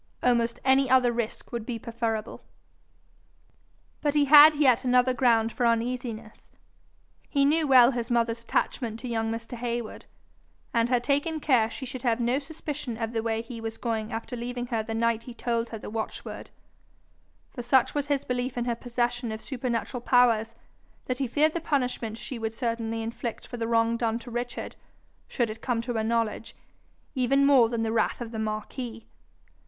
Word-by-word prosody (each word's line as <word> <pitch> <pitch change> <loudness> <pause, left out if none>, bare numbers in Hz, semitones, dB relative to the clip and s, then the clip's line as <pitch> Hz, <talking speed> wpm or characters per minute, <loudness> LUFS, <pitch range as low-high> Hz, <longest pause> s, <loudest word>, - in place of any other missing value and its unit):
Almost 235 -1 +2
any 265 0 +4
other 255 -2 +5
risk 235 -2 -4
would 235 -2 -3
be 235 0 -4
preferable. 225 -2 -3 1.6
But 295 -1 0
he 290 -1 +4
had 300 +2 +9
yet 260 -4 +4
another 250 0 +3
ground 230 -3 +3
for 250 - -2
uneasiness. 230 -1 -2 0.8
He 280 -2 +2
knew 310 +2 +2
well 255 -2 +7
his 240 -1 -3
mother's 235 -1 +1
attachment 230 -1 -1
to 255 - -5
young 225 -2 -1
Mr. 230 +2 -5
Heywood, 235 -1 -4 0.7
and 230 0 +2
had 245 -1 +2
taken 290 +4 0
care 250 -7 +3
she 260 - -7
should 255 0 -7
have 240 -1 +1
no 245 +3 +1
suspicion 295 -5 -6
of 225 0 -3
the 225 - 0
way 225 0 -1
he 230 -1 -8
was 225 0 -5
going 225 -1 -3
after 230 +2 -5
leaving 245 +1 -4
her 225 - +1
the 225 +1 -5
night 230 0 +1
he 240 0 -10
told 235 -1 -1
her 225 - -6
the - - -9
watchword; 220 0 -5 1.0
for 245 - -6
such 245 +1 +3
was 290 -1 -1
his 285 -2 0
belief 250 0 -2
in 240 - -1
her 240 - 0
possession 240 0 -2
of 220 - -5
supernatural 245 -1 -3
powers, 230 -3 +3 0.5
that 255 0 -3
he 270 - 0
feared 300 +6 +2
the 340 - -2
punishment 250 -7 -1
she 245 +1 -7
would 225 0 -3
certainly 230 -2 -2
inflict 230 0 -5
for 245 - -7
the 225 -1 -2
wrong 230 0 +2
done 230 -1 0
to 240 +1 -10
Richard, 240 +1 -4 0.5
should 235 -4 -1
it 220 +1 -10
come 245 -3 -1
to 245 0 -3
her 220 -1 -1
knowledge, 225 0 -1 0.6
even 275 +1 +2
more 265 -5 +6
than 230 -1 -1
the 220 - -1
wrath 225 -1 +1
of 235 -2 -6
the 220 - -5
marquis. 220 +2 -4
235 Hz, 180 wpm, -27 LUFS, 230-255 Hz, 1.6 s, had